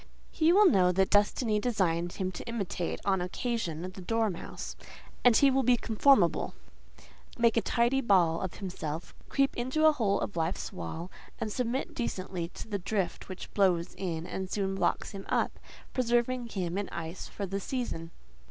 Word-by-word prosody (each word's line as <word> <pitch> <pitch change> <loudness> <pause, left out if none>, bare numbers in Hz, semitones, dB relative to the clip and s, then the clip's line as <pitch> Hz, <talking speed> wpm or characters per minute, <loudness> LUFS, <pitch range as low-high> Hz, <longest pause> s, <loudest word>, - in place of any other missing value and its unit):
He 320 0 +3
will 410 +4 +7
know 185 - +5
that 190 +1 +2
Destiny 210 +2 +3
designed 175 -7 0
him 185 -1 -2
to 180 - -7
imitate, 200 -6 -3
on 190 -2 +2
occasion, 180 -3 -2
the 185 +1 -7
dormouse, 220 -2 -2 0.5
and 245 -3 +7
he 280 -1 +6
will 270 +1 +3
be 250 -1 +4
conformable: 220 - +3 0.8
make 235 -1 +4
a 230 - +4
tidy 240 +4 +2
ball 180 -8 +3
of 190 - -4
himself, 165 -4 -5 0.2
creep 275 +1 +2
into 260 +6 +1
a 315 - +8
hole 225 -9 +1
of 205 - -3
life's 165 +2 -2
wall, 160 - -6 0.3
and 215 - -3
submit 250 +3 -2
decently 185 -7 -3
to - - -7
the 205 -2 -2
drift 195 0 -2
which 185 - -8
blows 180 -4 +2
in 170 -4 -3
and 185 +1 -4
soon 195 -1 -1
blocks 195 - 0
him 195 -2 -8
up, - - 0 0.3
preserving 240 0 +1
him 185 -4 -2
in 205 - -3
ice 170 +2 -6
for 200 - -5
the 195 +1 -3
season. 200 -8 -3
200 Hz, 170 wpm, -30 LUFS, 180-240 Hz, 0.8 s, a